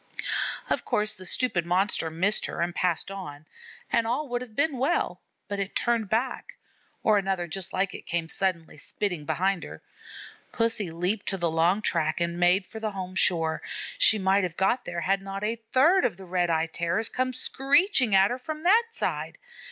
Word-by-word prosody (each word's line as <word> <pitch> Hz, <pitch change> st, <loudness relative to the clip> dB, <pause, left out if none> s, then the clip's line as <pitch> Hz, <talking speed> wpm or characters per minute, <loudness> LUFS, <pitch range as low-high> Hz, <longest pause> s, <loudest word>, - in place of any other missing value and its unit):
Of -, -, -1 dB
course 210 Hz, 0 st, 0 dB
the 185 Hz, -3 st, -7 dB
stupid 215 Hz, -8 st, +2 dB
Monster 180 Hz, -1 st, +2 dB
missed 185 Hz, +6 st, +1 dB
her -, -, -6 dB
and 175 Hz, +1 st, -1 dB
passed 180 Hz, +1 st, 0 dB
on, 155 Hz, -7 st, -8 dB, 0.5 s
and 230 Hz, -1 st, +2 dB
all 275 Hz, +6 st, -1 dB
would 245 Hz, 0 st, -2 dB
have 235 Hz, -4 st, -10 dB
been 285 Hz, -2 st, 0 dB
well, 275 Hz, +7 st, 0 dB, 0.3 s
but 200 Hz, -1 st, -4 dB
it 195 Hz, 0 st, -4 dB
turned 230 Hz, -4 st, 0 dB
back, 260 Hz, -, -2 dB, 0.5 s
or 215 Hz, -2 st, +4 dB
another 190 Hz, -2 st, -1 dB
just 180 Hz, +2 st, -5 dB
like 190 Hz, +1 st, 0 dB
it -, -, -10 dB
came 170 Hz, -1 st, -1 dB
suddenly 170 Hz, -4 st, -2 dB
spitting 180 Hz, -2 st, -3 dB
behind 180 Hz, +4 st, 0 dB
her. -, -, -10 dB, 0.7 s
Pussy 230 Hz, -5 st, 0 dB
leaped 180 Hz, +6 st, -2 dB
to 195 Hz, -, -1 dB
the 170 Hz, -2 st, 0 dB
long 170 Hz, +6 st, +2 dB
track 160 Hz, -3 st, +1 dB
and 170 Hz, 0 st, -1 dB
made 180 Hz, +2 st, +4 dB
for 220 Hz, -, -9 dB
the 220 Hz, -1 st, -2 dB
home 185 Hz, -1 st, -5 dB
shore. 165 Hz, -4 st, +2 dB, 0.4 s
She 360 Hz, -, +6 dB
might 195 Hz, 0 st, +2 dB
have 175 Hz, -3 st, -3 dB
got 215 Hz, +6 st, +1 dB
there 175 Hz, -1 st, -4 dB
had 195 Hz, +4 st, +1 dB
not 195 Hz, +1 st, -6 dB
a 225 Hz, +2 st, -2 dB
third 330 Hz, +9 st, +5 dB
of 225 Hz, -8 st, 0 dB
the 190 Hz, -, -10 dB
Red 175 Hz, -1 st, 0 dB
eyed 165 Hz, 0 st, 0 dB
Terrors 170 Hz, +6 st, 0 dB
come 255 Hz, +2 st, -1 dB
screeching 270 Hz, -, +2 dB
at 195 Hz, +2 st, +5 dB
her 250 Hz, -, -3 dB
from 310 Hz, +4 st, -6 dB
that 435 Hz, +6 st, +5 dB
side. 460 Hz, -, -3 dB
195 Hz, 190 wpm, -27 LUFS, 175-230 Hz, 0.7 s, She